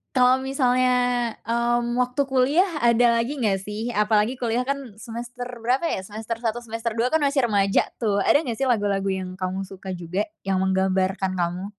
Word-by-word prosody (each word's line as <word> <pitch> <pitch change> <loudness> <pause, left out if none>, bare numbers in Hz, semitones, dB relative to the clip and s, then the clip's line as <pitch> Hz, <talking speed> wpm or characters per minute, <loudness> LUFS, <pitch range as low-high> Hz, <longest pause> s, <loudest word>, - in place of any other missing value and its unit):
kalo 255 +1 +5
misalnya, 250 -3 +1
mmm, 240 +1 0
waktu 250 +3 +1
kuliah 275 +9 +3
ada 235 0 +4
lagi 265 +6 -2
nggak 195 -4 +1
sih? 215 +3 -4
Apalagi 210 +3 +2
kuliah 240 +1 0
kan 275 -6 -4
semester 240 +2 -7 0.2
berapa 260 +7 +1
ya, 190 - -2
semester 220 +3 -5
1, 235 0 -1
semester 225 0 -4
2, 240 +2 +2
kan 320 -1 +1
masih 275 -3 +2
remaja 200 -2 +2
tuh. 205 -4 +1
Ada 295 - +4
gak 230 -3 -3
sih 270 - +1
lagu-lagu 200 -4 +1
yang 190 -1 -3
kamu 185 +1 -2
suka 190 0 -8
juga 180 +4 -2 0.2
yang 190 -1 +1
menggambarkan 190 0 +1
kamu? 175 +2 -2
230 Hz, 175 wpm, -24 LUFS, 195-250 Hz, 0.2 s, kalo